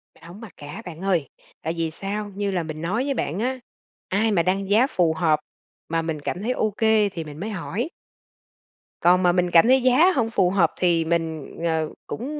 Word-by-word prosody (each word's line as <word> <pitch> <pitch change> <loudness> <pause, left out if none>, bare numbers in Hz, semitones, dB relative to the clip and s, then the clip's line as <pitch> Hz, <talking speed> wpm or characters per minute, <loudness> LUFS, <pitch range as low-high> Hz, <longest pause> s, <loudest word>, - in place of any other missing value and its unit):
Mình - - -22
hổng 175 +7 -11
mặc 220 - -10
cả 150 +10 -8
bạn 170 -1 -8
ơi, 180 -8 +1 0.3
tại 160 +1 -2
vì 165 -1 -1
sao? 205 +4 -4
Như 200 0 -1
là 180 -3 -1
mình 155 0 -6
nói 205 +9 -1
với 280 - 0
bạn 180 - -2
á, 255 +3 -1 0.5
ai 215 +4 +1
mà 170 -5 +2
đăng 195 +1 -1
giá 225 +6 +4
phù 170 - +2
hợp 160 -2 +2 0.5
mà 165 0 0
mình 160 -2 -3
cảm 180 +6 -4
thấy 235 - -1
OK 215 -4 -1 0.4
thì 165 -4 -5
mình 150 0 -10
mới 205 +5 -4
hỏi. 215 - -3 1.1
Còn 180 +1 +4
mà 175 - +5
mình 180 0 +1
cảm 170 +5 +6
thấy 260 +1 +5
giá 260 +9 +5
hông 230 -4 +1
phù 190 -5 +2
hợp 180 -4 +3
thì 170 -2 +2
mình, 160 -2 -2
ờ, 160 -2 0 0.2
cũng 290 +6 -5
180 Hz, 215 wpm, -23 LUFS, 165-215 Hz, 1.1 s, cảm